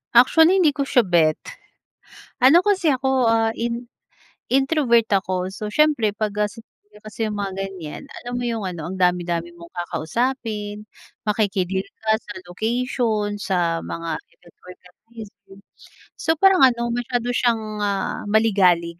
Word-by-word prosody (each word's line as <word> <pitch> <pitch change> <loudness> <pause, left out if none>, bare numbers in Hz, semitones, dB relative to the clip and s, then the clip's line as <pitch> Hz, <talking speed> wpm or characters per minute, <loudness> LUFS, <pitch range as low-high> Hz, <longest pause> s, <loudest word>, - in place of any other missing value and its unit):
Actually, 320 +9 +6
hindi 310 -4 +4
ko 280 -1 -3
siya 245 - +4
bet. 170 -5 +3 1.0
Ano 265 +7 +6
kasi 375 -6 +2
ako, 265 -1 +1
ah, 225 0 +3
in 235 +1 -3 0.6
introvert 270 -4 +3
ako. 185 -2 0
So, 210 +2 -6
siyempre 290 -8 +2
'pag 215 0 -2
gasi 210 +2 -2
pagka 210 -1 -23
kasi 220 +2 -2
yung 210 -1 -4
mga 200 -2 -3
ganiyan, 180 - -8 0.2
alam 245 0 -7
mo - - -3
yung 230 -3 -2
ano, 175 -4 -5
ang 190 - -6
dami-dami 175 -2 0
mong 170 0 -13
kakausapin, 210 +4 -3 0.4
makiki-deal 195 -3 0 0.2
ka 220 0 +2
sa - - -9
location, 220 +1 -1
sa 170 -4 0
mga 165 0 -4
event 175 - -23
organizer. 195 +2 -14 0.6
So, 320 - +1
parang 385 -1 +5
ano, 235 -1 +1
masyado 245 0 -2
siyang, 235 -2 +1 0.2
ah, 200 -1 -2
maligalig 185 -6 +2
215 Hz, 140 wpm, -22 LUFS, 185-245 Hz, 1.0 s, Actually